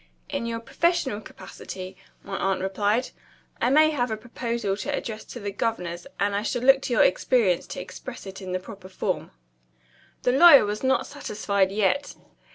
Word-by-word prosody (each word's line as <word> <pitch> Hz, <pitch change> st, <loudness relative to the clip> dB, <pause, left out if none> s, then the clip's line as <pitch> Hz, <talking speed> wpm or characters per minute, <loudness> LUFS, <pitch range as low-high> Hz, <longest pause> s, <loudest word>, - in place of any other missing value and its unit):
"In 235 Hz, -, -3 dB
your 230 Hz, 0 st, -3 dB
professional 270 Hz, -3 st, 0 dB
capacity," 185 Hz, -2 st, -9 dB, 0.3 s
my 195 Hz, -, -5 dB
aunt 195 Hz, 0 st, 0 dB
replied. 205 Hz, +5 st, 0 dB, 0.5 s
"I 240 Hz, -, +3 dB
may 310 Hz, +3 st, +5 dB
have 250 Hz, -5 st, 0 dB
a 220 Hz, -, -2 dB
proposal 235 Hz, -2 st, -3 dB
to 195 Hz, -, -3 dB
address 220 Hz, -1 st, -4 dB
to 245 Hz, -, -9 dB
the 205 Hz, -2 st, -4 dB
governors; 180 Hz, -3 st, -3 dB
and 200 Hz, 0 st, +1 dB
I 200 Hz, -, 0 dB
shall 245 Hz, +3 st, -2 dB
look 270 Hz, +1 st, +6 dB
to 250 Hz, -, -2 dB
your 225 Hz, -, +5 dB
experience 195 Hz, -4 st, +2 dB
to -, -, -6 dB
express -, -, -9 dB
it 195 Hz, 0 st, -8 dB
in 185 Hz, -1 st, -6 dB
the 185 Hz, -, 0 dB
proper 190 Hz, -1 st, -11 dB
form." 190 Hz, -, -3 dB, 0.9 s
The 250 Hz, -, +3 dB
lawyer 280 Hz, -2 st, +8 dB
was 210 Hz, +1 st, -3 dB
not 265 Hz, 0 st, +2 dB
satisfied 200 Hz, -7 st, -1 dB
yet. 215 Hz, +8 st, 0 dB
215 Hz, 175 wpm, -25 LUFS, 195-250 Hz, 0.9 s, lawyer